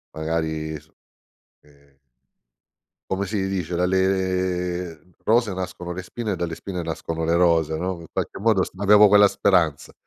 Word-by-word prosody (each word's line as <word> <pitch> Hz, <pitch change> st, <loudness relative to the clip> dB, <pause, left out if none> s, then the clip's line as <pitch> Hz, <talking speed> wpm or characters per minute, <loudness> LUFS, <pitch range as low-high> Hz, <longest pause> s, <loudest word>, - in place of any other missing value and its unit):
magari, 80 Hz, -1 st, -3 dB
s 80 Hz, +2 st, -25 dB, 0.7 s
ehm 70 Hz, -1 st, -26 dB, 1.1 s
Come 95 Hz, +1 st, -1 dB
si 95 Hz, -1 st, -1 dB
dice, 90 Hz, -3 st, -3 dB
Dalle 90 Hz, -1 st, 0 dB
mhmm, 90 Hz, -, -27 dB
rose 115 Hz, -2 st, +2 dB
nascono 90 Hz, -1 st, -5 dB
le 90 Hz, -, -5 dB
spine 110 Hz, +4 st, -5 dB
e -, -, -1 dB
dalle 85 Hz, -1 st, -3 dB
spine 90 Hz, 0 st, -5 dB
nascono 80 Hz, 0 st, -4 dB
le 85 Hz, +1 st, +1 dB
rose, 85 Hz, -3 st, +2 dB
no, 90 Hz, +1 st, -3 dB
in 85 Hz, -, -11 dB
qualche -, -, -4 dB
modo 105 Hz, -2 st, +3 dB
sp 95 Hz, -, -13 dB
avevo 105 Hz, +1 st, +7 dB
quella 105 Hz, 0 st, +7 dB
speranza. 85 Hz, -8 st, +1 dB
90 Hz, 155 wpm, -23 LUFS, 80-95 Hz, 1.1 s, avevo